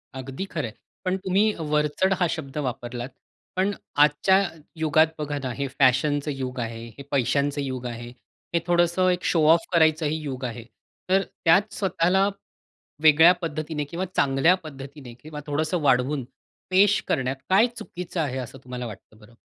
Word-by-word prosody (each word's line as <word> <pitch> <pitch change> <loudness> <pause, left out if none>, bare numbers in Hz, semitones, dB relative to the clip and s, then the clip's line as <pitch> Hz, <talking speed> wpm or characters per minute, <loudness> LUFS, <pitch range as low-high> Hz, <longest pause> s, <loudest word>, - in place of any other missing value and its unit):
अगदी 135 +8 -5
खरं 155 -10 -4
आहे. 110 - -10 0.3
पण 185 +1 +1
तुम्ही 190 +2 +2 0.3
वरचढ 150 +5 +2
हा 175 - +3
शब्द 150 -3 -8
वापरलात 120 0 -5 0.5
पण 190 +2 +1 0.3
आजच्या 190 +6 +4 0.3
युगात 160 0 +3
बघा 145 -1 -3
ना, 130 - -2
हे 140 +1 -3
फॅशनचं 145 +3 +3
युग 130 -2 -5
आहे, 115 0 -5
हे 140 - -8
पैशांच 140 +2 +1
युग 130 -2 -4
आहे, 120 0 -6 0.5
हे 170 - +3
थोडंसं 175 +1 +3
एक 180 0 0
शो 165 - +2
ऑफ 170 - +1
करायचं 160 -1 +4
ही 155 +2 0
युग 130 -3 -5
आहे. 120 -1 -5 0.5
तर 190 +1 +4 0.2
त्यात 190 +6 +4
स्वतःला 190 0 +2 0.8
वेगळ्या 160 +3 +8
पद्धतीने 155 -1 -3
किंवा 170 +6 -4
चांगल्या 140 +6 +4
पद्धतीने 135 -3 -10
किंवा 150 0 -8
थोडंसं 155 +4 -1
वाढवून, 135 0 +2 0.5
पेश 200 +3 +4
करण्यात 135 -2 0
काय 200 +5 +6
चुकीचं 180 -5 -5
आहे 130 -4 -2
असं 130 +1 -7
तुम्हाला 125 -1 -5
वाटतं 110 0 -11
बरं? 115 +2 -18
150 Hz, 155 wpm, -25 LUFS, 130-175 Hz, 0.8 s, वेगळ्या